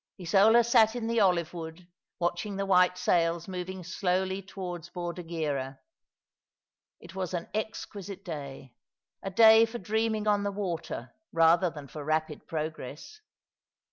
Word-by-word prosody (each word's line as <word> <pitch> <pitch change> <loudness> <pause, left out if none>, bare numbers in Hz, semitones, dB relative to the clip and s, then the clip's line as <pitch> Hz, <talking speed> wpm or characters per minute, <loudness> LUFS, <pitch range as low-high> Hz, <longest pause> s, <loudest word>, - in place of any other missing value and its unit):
Isola 205 +6 +5
sat 225 -1 +4
in 240 -2 -3
the 230 0 +1
olive 180 -5 +2
wood, 165 +1 -8 0.3
watching 175 +4 -2
the 195 0 -2
white 180 -1 +4
sails 170 -2 +1
moving 185 0 -5
slowly 190 +1 -1
towards 180 -3 -7
Bordighera. 165 -6 -4 1.2
It 170 0 -13
was 185 -1 -3
an 170 - -4
exquisite 205 -2 -5
day— 140 -6 -7 0.5
a 195 - -4
day 220 +3 +7
for 230 +1 -6
dreaming 220 +1 -1
on 205 -1 +3
the 200 0 -1
water 170 - -4 0.2
rather 165 +2 +4
than 150 -4 -10
for 150 +2 -8
rapid 155 +1 -2
progress. 155 - -6
180 Hz, 135 wpm, -29 LUFS, 165-200 Hz, 1.2 s, day